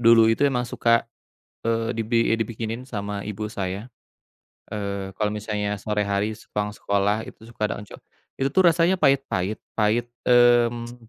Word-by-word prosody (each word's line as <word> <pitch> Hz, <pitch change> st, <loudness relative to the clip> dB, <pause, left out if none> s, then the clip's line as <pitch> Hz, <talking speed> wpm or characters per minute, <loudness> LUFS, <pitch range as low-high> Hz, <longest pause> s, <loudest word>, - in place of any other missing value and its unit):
dulu 115 Hz, -1 st, +7 dB
itu 115 Hz, +4 st, +2 dB
emang 125 Hz, -2 st, 0 dB
suka, 115 Hz, -1 st, +2 dB, 0.6 s
eee, 115 Hz, +1 st, 0 dB
dibi 115 Hz, +1 st, +1 dB
dibikinin 115 Hz, +1 st, -4 dB
sama 105 Hz, -5 st, -4 dB
ibu 105 Hz, +1 st, -4 dB
saya. 100 Hz, +1 st, -4 dB, 0.8 s
Eee, 100 Hz, -2 st, -4 dB
kalau 105 Hz, -1 st, +1 dB
misalnya 105 Hz, -1 st, -2 dB
sore 105 Hz, 0 st, -1 dB
hari 100 Hz, +2 st, 0 dB
sepulang 105 Hz, 0 st, -3 dB
sekolah 100 Hz, +1 st, 0 dB
itu -, -, -12 dB
suka 115 Hz, -, -9 dB
ada -, -, -3 dB
oncom. 105 Hz, -, -12 dB, 0.4 s
Itu, 135 Hz, -, +1 dB
tuh, 185 Hz, +7 st, +3 dB
rasanya 170 Hz, +3 st, +3 dB
pahit-pahit, 135 Hz, -, +1 dB, 0.2 s
pahit 110 Hz, +2 st, +2 dB, 0.2 s
mmm, 120 Hz, -1 st, +3 dB
110 Hz, 145 wpm, -24 LUFS, 105-120 Hz, 0.8 s, dulu